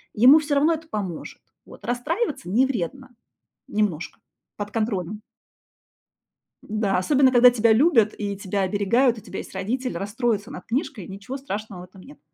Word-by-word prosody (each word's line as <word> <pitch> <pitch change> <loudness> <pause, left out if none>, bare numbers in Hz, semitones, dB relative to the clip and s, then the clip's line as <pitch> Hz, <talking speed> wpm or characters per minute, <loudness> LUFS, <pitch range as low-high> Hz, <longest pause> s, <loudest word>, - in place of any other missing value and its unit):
ему 260 +8 +8
всё 290 -1 -1
равно 305 +4 +4
это 320 0 -6
поможет, 190 -6 -5 0.2
вот. - - -14
Расстраиваться 255 - -2
не 245 +7 +3
вредно 260 +2 -4 0.6
немножко, 195 -6 -2 0.4
под 205 0 -5
контролем. 210 -2 -2 1.4
Да, 210 -3 -1
особенно, 265 +5 +3
когда 245 0 +8
тебя 230 -2 +3
любят 235 -5 +4
и 200 -2 -3
тебя 200 0 -2
оберегают, 215 +6 +2
у - - -9
тебя - - -7
есть - - -9
родители, 250 +4 -2
расстроится 215 +3 -2
над - - -9
книжкой, 250 - -3
ничего 200 +8 -7
страшного 210 -7 -6
в - - -9
этом 185 +1 -17
нет. 145 -4 -15
220 Hz, 155 wpm, -24 LUFS, 200-260 Hz, 1.4 s, ему